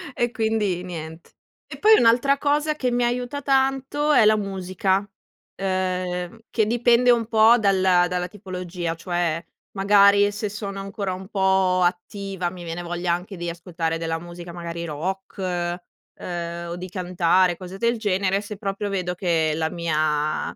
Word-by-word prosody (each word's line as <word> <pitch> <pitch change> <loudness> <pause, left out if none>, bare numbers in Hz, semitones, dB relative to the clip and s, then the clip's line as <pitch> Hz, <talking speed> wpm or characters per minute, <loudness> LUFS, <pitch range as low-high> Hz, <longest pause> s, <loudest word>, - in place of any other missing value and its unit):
e 240 0 0
quindi 220 -6 0
niente. 160 -2 -8 0.4
E - - -9
poi 435 0 +7
un'altra 245 +4 +4
cosa 295 +2 +1
che 255 -4 -1
mi 245 0 +1
aiuta 245 +3 -2
tanto 270 +2 +1
è 230 - +6
la 215 +1 +6
musica, 190 0 -1 0.5
ehm, 185 0 -2
che 220 - +1
dipende 240 +2 +4
un 230 -2 +2
po' 225 +1 +6
dalla 190 -4 +3
dalla 180 0 -2
tipologia. 180 -3 -5
Cioè, 170 -1 -2 0.3
magari 200 +1 +5
se 205 0 -3
sono 200 -1 -6
ancora 195 -1 -4
un 185 +1 -8
po' 190 -2 +2
attiva 180 +1 -2
mi 180 -1 -10
viene 165 +1 -5
voglia 175 0 -1
anche 180 +3 -5
di 175 0 -3
ascoltare 165 -1 -3
della 165 0 -2
musica, 175 0 -9
magari 170 -1 -5
rock, 180 +7 -5 0.8
ehm, 170 -1 -5
o 170 - -4
di 180 +1 -7
cantare 180 -1 +2
cose 185 0 -9
del 235 +3 +1
genere, 195 -2 0
se 210 0 -8
proprio 200 0 -3
vedo 180 -2 -2
che 165 -4 +1
la 160 0 -1
mia 155 -2 -1
185 Hz, 155 wpm, -23 LUFS, 175-215 Hz, 0.8 s, poi